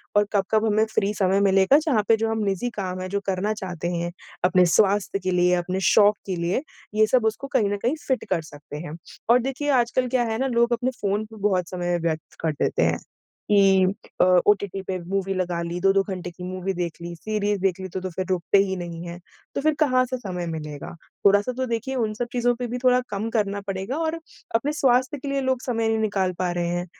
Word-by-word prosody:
और 205 0 +5
कब-कब 215 +3 +2
हमें 220 0 +3
फ्री 205 +1 +2
समय 195 0 +2
मिलेगा 195 +7 +5
जहाँ 275 -10 +1
पे 225 - +6
जो 225 0 0
हम 220 - -1
निजी 200 +5 -1
काम 185 -1 -3
है 185 - -4
जो 200 +1 -1
करना 195 +3 0
चाहते 180 -4 -4
हैं 170 0 -2 0.3
अपने 180 0 +5
स्वास्थ्य 200 +1 +2
के 185 - 0
लिए 180 0 +3
अपने 180 +2 -2
शौक 210 -1 +5
के 185 - -1
लिए 175 +9 0 0.3
ये 215 0 +5
सब 245 0 +2
उसको 220 +5 -1
कहीं 215 -6 +3
न - - -1
कहीं 270 +6 +2
फिट 260 -2 0
कर 170 -3 +2
सकते 145 -1 -10
हैं। 155 0 -7 0.3
और 240 +1 +7
देखिए 270 +3 -3
आजकल 250 +2 0
क्या 250 -1 +2
है 220 - -1
ना 265 - +1
लोग 235 -1 +2
अपने 245 +2 0
फ़ोन 205 +1 0
पे 220 +1 -14
बहुत 180 -2 0
समय 175 -1 -1
व्यर्थ 160 -1 -3
कर 160 -1 +1
देते - - +2
हैं। - - +2 0.5
कि 195 -2 +5 0.4
अ, - - +7 0.2
ओटीटी 200 -2 +2
पे 190 - -1
मूवी 195 0 -1
लगा 175 -2 -1
ली, 170 +1 -4
2-2 195 0 +4
घंटे 185 -2 -5
की 180 +1 -11
मूवी 185 +1 -3
देख 175 -2 -3
ली, 170 0 -6
सीरीज़ 205 +1 -1
देख 190 -1 +1
ली 190 - -4
तो 185 +1 -5
फिर 185 +2 -4
रुकते 185 +1 +2
ही 190 - -2
नहीं 170 -1 -6
है, 170 - -7 0.4
तो - - 0
फिर 310 +1 +3
कहाँ 255 -4 +4
से 255 +1 -3
समय 180 -7 -5
मिलेगा? 150 -2 -6 0.3
थोड़ा-सा 205 +4 +4
तो 260 - 0
देखिए 235 +3 -2
उन 220 -4 0
सब 240 +2 -3
चीज़ों 245 0 +2
पे 245 +1 -4
भी 240 +1 -3
थोड़ा 250 0 +5
कम 210 +2 -3
करना 205 -3 0
पड़ेगा 195 +7 -3
और 320 0 -1 0.4
अपने 275 +6 +1
स्वास्थ्य 260 0 +2
के 280 - -7
लिए 275 0 0
लोग 260 -1 0
समय 230 -3 0
नहीं 225 0 +1
निकाल 200 -4 0
पा 180 -1 0
रहे 175 0 -1
हैं, 175 +1 -2
200 Hz, 230 wpm, -24 LUFS, 180-235 Hz, 0.5 s, और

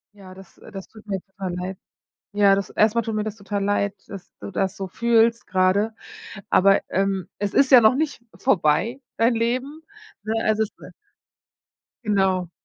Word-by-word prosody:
Ja 190 -2 -13
das, 190 -1 -16
äh - - -15
das 195 -2 -8
tut 220 -1 -17
mir 195 - -2
jetzt 190 +1 -9
aber 190 -2 -4
leid. 185 +1 -5 0.6
Ja 200 -1 +4
das 195 -1 -2
erst 215 +1 +2
einmal 235 - +1
tut 225 -2 -3
mir 210 0 -1
das 215 -1 -5
total 200 -1 -4
leid, 200 0 0
dass 195 -2 -10
du - - -7
das 190 0 -2
so 195 - -5
fühlst 230 +3 +2
gerade, 190 +4 +1 0.6
aber, 195 +1 +4
ähm, 195 -2 -1
es 205 -1 -3
ist 275 0 +3
ja 255 - +10
noch 220 +3 +4
nicht 300 -4 -2 0.2
vorbei 225 - +1 0.2
dein 230 +1 +3
Leben. 255 +7 -2 0.4
Ne 220 +1 -2
es 215 0 +1
ist, 220 -1 -1
äh - - -11 1.1
Genau. 190 -4 +1
205 Hz, 185 wpm, -23 LUFS, 190-225 Hz, 1.1 s, ja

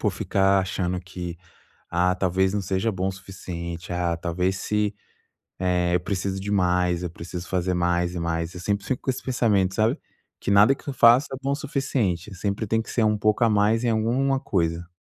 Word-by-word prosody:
por - - +1
ficar 95 0 +2
achando 90 -1 -2
que: 90 -1 -7 0.5
"Ah, 90 +1 +2
talvez 95 +1 +1
não 100 - 0
seja 95 +4 0
bom 95 +1 -1
o - - -2
suficiente. 90 -2 -7
Ah, 85 -1 0
talvez 90 +3 -1
se 105 0 0 0.7
eh, 90 -1 +1
eu - - +3
preciso 95 +1 -2
de 100 +2 -5
mais. 90 -2 +2
Eu 90 - -2
preciso 85 +1 -7
fazer 90 0 0
mais 90 0 0
e - - -3
mais". 85 0 -2
Eu - - -6
sempre 100 +1 -1
fico 130 - -2
com 130 - +1
esse - - -6
pensamento, 105 -7 +1
sabe. 110 +1 +1 0.4
Que - - -2
nada 105 +7 +6
que 140 - -19
eu 140 - -2
faça 120 +2 +6
é - - -3
bom 140 +1 -1
o - - +1
suficiente, 130 - -2
sempre 100 +2 -2
tem 115 +1 +1
que - - -9
ser 115 - +1
um 105 -1 +2
pouco 105 +2 +2
a 115 - +4
mais 105 +3 +2
em 120 - +2
alguma 125 +5 +1
coisa. 85 -5 -1
95 Hz, 210 wpm, -24 LUFS, 90-110 Hz, 0.7 s, nada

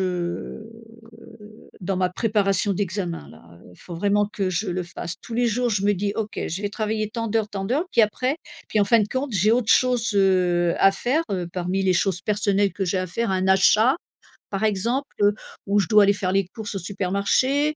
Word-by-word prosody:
heu, 180 +3 -4 1.1
dans 185 +1 -2
ma 185 -1 +2
préparation 200 -1 +1
d'examen 185 -3 -3
là, 80 - -16 0.2
heu. - - -16
Faut 175 - -10
vraiment 205 +4 +1
que 200 -2 -3
je 185 +3 -2
le 180 +1 -2
fasse. 170 0 -6
Tous 230 - -8
les 240 +1 +2
jours, 240 +2 0
je 200 -2 0
me 205 - +4
dis: 200 +2 -2
«OK, 215 -1 -3
je 180 +6 -4
vais 205 - -1
travailler 215 0 -2
tant 230 0 -3
d'heures 220 0 0
tant 195 -1 -4
d'heures». 275 - 0
Puis - - +4
après 255 +6 0 0.3
puis 215 - +1
en - - +4
fin 225 +3 +4
de 210 - -1
compte 260 +3 -3
j'ai 205 +3 +3
autre 235 -2 +1
chose, 250 -2 +2
heu, 180 -3 +3
à 195 - +6
faire, 265 +10 0
heu, 180 -2 -2
parmi 180 +2 -2
les 190 -1 +3
choses 180 -1 0
personnelles 205 -1 +1
que 195 - -3
j'ai 185 +2 0
à 185 - -2
faire. 230 +5 -2
Un 190 0 0
achat 215 +7 +4 0.6
par 195 +1 -2
exemple, 235 +7 -1
heu, 205 0 +5 0.3
ou 200 +1 +2
je 195 - 0
dois 210 -1 +6
aller 200 0 +4
faire 195 -2 -2
les 195 0 +2
courses 220 -2 -5
au - - -2
supermarché, 200 - 0
200 Hz, 215 wpm, -23 LUFS, 185-220 Hz, 1.1 s, à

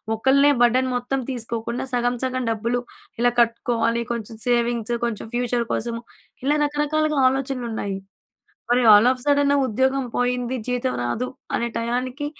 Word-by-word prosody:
ఒకల్నే 275 +5 +4
burden 255 +2 +4
మొత్తం 245 +2 -1
తీసుకోకుండా 235 -1 -3
సగం, 245 0 +1
సగం 255 0 -1
డబ్బులు 230 +2 -1 0.4
ఇలా 245 0 +3
కట్టుకోవాలి. 235 0 +1
కొంచెం 230 -1 -5
సేవింగ్సు, 240 -1 +1
కొంచెం 235 -3 -4
ఫ్యూచర్ 245 -1 0
కోసము. 230 0 -2 0.4
ఇలా 290 +3 +2
రకరకాలుగా 295 +1 0
ఆలోచనలు 265 -1 -3
ఉన్నాయి. 200 -3 -3 0.7
మరి 245 +1 +4
ఆల్ 210 +4 +6
ఆఫ్ 255 - -7
సడెన్ 285 0 +3
ఉద్యోగం 265 +3 +1
పోయింది. 245 0 0
జీతం 250 +1 -1
రాదు. 225 - -2 0.3
అనే 235 - -1
టయానికి 250 +4 -2
245 Hz, 135 wpm, -23 LUFS, 235-260 Hz, 0.7 s, ఆల్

